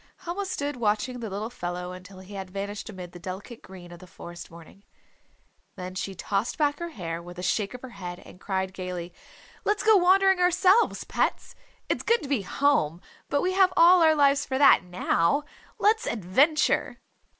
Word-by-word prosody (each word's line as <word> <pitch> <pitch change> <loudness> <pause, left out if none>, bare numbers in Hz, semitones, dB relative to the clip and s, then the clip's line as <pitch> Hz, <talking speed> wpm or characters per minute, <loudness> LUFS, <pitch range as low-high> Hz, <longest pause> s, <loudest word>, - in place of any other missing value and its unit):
Helma 370 +3 -4
stood 290 -6 -3
watching 235 +3 -1
the 225 -2 -5
little 210 +4 -5
fellow 180 -4 -5
until 185 +1 -11
he 190 +2 -13
had 190 -1 -6
vanished 200 +3 -5
amid 180 -4 -9
the 175 - -11
delicate 190 +6 -8
green 180 -2 -12
of 175 - -11
the 185 - -13
forest 175 0 -10
morning. 170 +3 -15 0.9
Then 185 0 -6
she 190 +1 -4
tossed 200 +5 -2
back 290 -1 +1
her 340 0 -4
hair 170 - -5
with 175 +1 -11
a 180 - -6
shake 205 +4 -1
of 250 - -11
her 260 - -7
head 180 -4 -7
and 180 - -15
cried 190 -1 -2
gayly, 180 -2 -6 0.5
"Let's 415 +1 0
go 440 0 +6
wandering 380 +1 +4
ourselves, 365 +5 +3
pets. - - -2 0.3
It's - - -1
good 465 -4 +1
to - - -6
be 275 -7 +1
home, 190 - +1 0.3
but 285 - +1
we 370 +1 0
have 380 -1 +4
all 350 +2 +7
our 315 -1 +5
lives 280 -1 +3
for 265 - -3
that 285 - +6
now. 180 - +1 0.3
Let's 440 +2 +2
adventure!" 240 - +1
210 Hz, 185 wpm, -26 LUFS, 180-305 Hz, 0.9 s, all